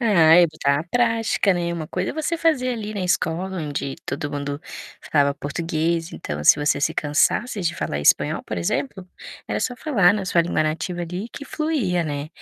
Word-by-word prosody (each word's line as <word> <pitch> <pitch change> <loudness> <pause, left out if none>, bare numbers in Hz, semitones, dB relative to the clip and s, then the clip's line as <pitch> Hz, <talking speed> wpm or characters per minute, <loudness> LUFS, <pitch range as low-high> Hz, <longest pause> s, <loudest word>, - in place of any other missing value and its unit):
É, 225 -4 +2
ai 165 +2 +7
que 155 - -13
está 140 +2 +1
prática, 230 -4 +2
né, 170 -1 -1
uma 160 -2 -5
coisa 185 0 -2
é - - -5
você 315 +2 -2
fazer 310 -6 +1
ali, 215 -3 -4
na 200 - -3
escola, 180 +1 -1
onde 145 -3 -4
todo 145 +2 -3
mundo 145 0 -4 0.5
falava 140 -2 +3
português, 165 +3 -2
então 75 0 -5
se - - +8
você 145 -1 0
se - - 0
cansasse 190 +9 +1
de 170 0 0
falar 75 - -3
espanhol, 75 - +3
por - - -5
exemplo, 140 - -2 0.4
era - - -1
só 250 - -2
falar 205 - +3
na 200 -3 -2
sua 175 -2 +2
língua 165 -2 0
nativa 165 +3 -2
ali, 180 +6 -5
que 285 - -8
fluía, 255 - -1
né. 145 0 -4
170 Hz, 195 wpm, -22 LUFS, 150-210 Hz, 0.5 s, se